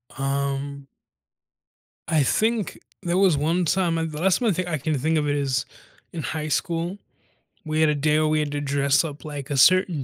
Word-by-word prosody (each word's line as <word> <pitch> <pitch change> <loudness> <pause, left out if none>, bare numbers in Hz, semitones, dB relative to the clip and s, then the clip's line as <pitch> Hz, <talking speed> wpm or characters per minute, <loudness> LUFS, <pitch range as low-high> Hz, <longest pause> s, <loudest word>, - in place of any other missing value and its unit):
Um 140 0 -3 1.2
I 155 -3 +3
think 220 - 0 0.2
there 175 +1 0
was 190 -6 +4
one 165 +5 +1
time 170 0 +1
and 165 -1 -2
the 150 +1 -6
last 190 -1 +3
one 235 -3 +2
I - - +1
think 185 +1 -2
I 160 - -1
can 150 +1 -1
think 155 +4 +1
of 150 - 0
it 145 - +1
is 135 -3 -1 0.5
in 165 - -4
high 155 -1 -3
school, 170 +4 -1 0.7
we 155 0 -1
had 155 - +4
a 150 - +1
day 150 +1 +2
where 155 - +2
we 155 0 +2
had 150 -1 -2
to 145 0 -3
dress 140 +1 +2
up 150 -2 -7
like 145 -3 -6
a 140 - -1
certain 180 0 +4
155 Hz, 210 wpm, -24 LUFS, 140-170 Hz, 1.2 s, was